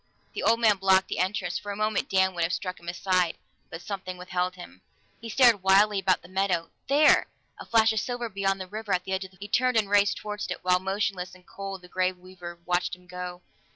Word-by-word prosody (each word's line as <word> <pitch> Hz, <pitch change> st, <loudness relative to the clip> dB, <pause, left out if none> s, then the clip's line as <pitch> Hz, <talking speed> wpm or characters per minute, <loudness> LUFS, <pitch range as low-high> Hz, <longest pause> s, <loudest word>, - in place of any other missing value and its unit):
The -, -, -4 dB
old 230 Hz, +1 st, +3 dB
man 215 Hz, -3 st, +4 dB
blocked 190 Hz, 0 st, +3 dB
the -, -, -3 dB
entrance; 185 Hz, -1 st, -1 dB
for 205 Hz, -, -6 dB
a -, -, -4 dB
moment 215 Hz, 0 st, -1 dB
Dan 190 Hz, 0 st, +3 dB
would 175 Hz, -, -4 dB
have 165 Hz, +2 st, 0 dB
struck 185 Hz, -4 st, -4 dB
him 170 Hz, -, -16 dB
aside, 180 Hz, -1 st, 0 dB, 0.3 s
but 165 Hz, -, -8 dB
something 185 Hz, -3 st, -5 dB
withheld 180 Hz, 0 st, -2 dB
him. 95 Hz, -, -12 dB, 0.4 s
He 230 Hz, -, -8 dB
stared 235 Hz, -3 st, +5 dB
wildly 195 Hz, +2 st, +4 dB
about 185 Hz, -1 st, +1 dB
the -, -, -12 dB
meadow 185 Hz, -3 st, -1 dB, 0.2 s
there! 290 Hz, +3 st, +5 dB, 0.3 s
A -, -, -9 dB
flash 225 Hz, -1 st, +4 dB
of 220 Hz, -, 0 dB
silver 245 Hz, +1 st, -3 dB
beyond 195 Hz, -2 st, -1 dB
the 185 Hz, -, -5 dB
river, 210 Hz, 0 st, -2 dB
at 180 Hz, -, -3 dB
the 190 Hz, -, -7 dB
edge 190 Hz, 0 st, -2 dB
of -, -, -11 dB
the 185 Hz, -, -23 dB
forest. 200 Hz, -, -9 dB
He -, -, +5 dB
turned 255 Hz, -2 st, +2 dB
and 215 Hz, -2 st, +2 dB
raced 205 Hz, -1 st, +4 dB
toward 210 Hz, 0 st, -6 dB
it, -, -, -5 dB
while 180 Hz, 0 st, +3 dB
motionless 190 Hz, -1 st, -2 dB
and 180 Hz, -1 st, -19 dB
cold 195 Hz, -1 st, -7 dB
the -, -, -12 dB
Grey 185 Hz, +1 st, 0 dB
Weaver 180 Hz, -1 st, -11 dB
watched 180 Hz, 0 st, 0 dB
him 180 Hz, 0 st, -22 dB
go. 180 Hz, 0 st, -7 dB
190 Hz, 240 wpm, -27 LUFS, 180-205 Hz, 0.4 s, stared